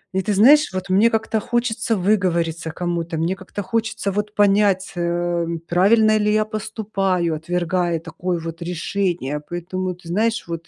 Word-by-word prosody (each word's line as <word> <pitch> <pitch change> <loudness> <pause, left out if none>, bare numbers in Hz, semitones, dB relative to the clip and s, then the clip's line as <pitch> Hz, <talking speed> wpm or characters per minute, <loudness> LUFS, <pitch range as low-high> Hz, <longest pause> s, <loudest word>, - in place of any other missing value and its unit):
И 190 - +2
ты 210 +1 -1
знаешь, 270 +5 +5
вот 185 0 -4
мне 210 +5 +4 0.3
хочется 230 0 -1
выговориться 170 -5 0
кому-то, 170 -1 -3
мне 170 +4 0
как-то 195 +1 -7
хочется 220 0 -2
вот 210 +1 -3
понять, 200 -2 +3
э, 175 0 -1 0.2
правильно 215 +5 +4
ли 210 0 +2
я 215 0 +2
поступаю, 195 -5 -2
отвергая 175 +1 -1
такое 170 +2 -4
вот 165 +1 -7
решение. 175 -4 -2
Поэтому, 180 +1 -3
ты 175 -1 -16
знаешь, 220 +5 0
вот 170 0 -6
185 Hz, 145 wpm, -21 LUFS, 170-210 Hz, 0.3 s, знаешь